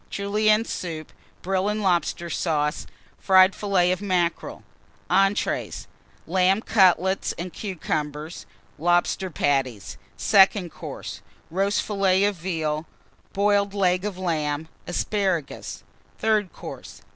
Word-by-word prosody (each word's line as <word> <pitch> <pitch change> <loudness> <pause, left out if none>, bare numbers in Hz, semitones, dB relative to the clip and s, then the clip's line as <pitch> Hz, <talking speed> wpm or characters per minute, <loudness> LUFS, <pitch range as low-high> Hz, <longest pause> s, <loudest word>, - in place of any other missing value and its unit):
Julienne 215 +2 +2
Soup. 160 -7 -5 0.3
Brill 190 +2 0
and 210 0 -2
Lobster 175 -2 0
Sauce. 155 -2 -1 0.3
Fried 190 0 +6
Fillets 185 -3 +2
of 185 - -5
Mackerel. 180 -4 -1 0.5
ENTREES 195 +1 +1 0.4
Lamb 190 +3 +2
Cutlets 190 -2 +3
and 175 +1 -6
Cucumbers. 155 -5 -4 0.3
Lobster 175 +3 +1
Patties. 135 - -1 0.2
SECOND 190 -2 +4
COURSE. - - -8 0.3
Roast 195 +3 +1
Fillet 195 -2 +2
of 205 0 +2
Veal. 160 -3 -2 0.5
Boiled 200 0 +2
Leg 185 -2 +2
of 205 -3 -4
Lamb. 160 -4 -2 0.2
Asparagus. 185 -4 -2 0.3
THIRD 215 -5 +1
COURSE. - - -10
185 Hz, 105 wpm, -24 LUFS, 165-200 Hz, 0.5 s, Fried